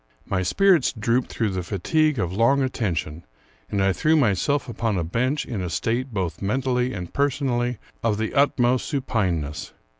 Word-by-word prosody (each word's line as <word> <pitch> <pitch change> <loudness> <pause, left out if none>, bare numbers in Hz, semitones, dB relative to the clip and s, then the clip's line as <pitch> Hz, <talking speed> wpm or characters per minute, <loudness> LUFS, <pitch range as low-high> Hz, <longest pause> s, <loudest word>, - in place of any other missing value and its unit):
My 95 -2 -1
spirits 180 - +3
drooped 120 +2 0
through 110 -3 -1
the 95 -1 -2
fatigue 135 - +1
of 90 -4 -1
long 120 +7 +3
attention, 85 - -2 0.5
and 100 -1 0
I 95 0 +3
threw 155 - +2
myself 140 - +1
upon 115 -3 -1
a 85 - 0
bench, 125 - -1
in 105 -5 -4
a 90 - -3
state, 120 - -1
both 90 -6 -3
mentally 125 +4 0
and 90 -7 -6
personally, 130 -4 0 0.2
of 110 -3 +1
the 110 0 -2
utmost 130 -3 +2
supineness. 90 - -2
115 Hz, 160 wpm, -24 LUFS, 95-130 Hz, 0.5 s, spirits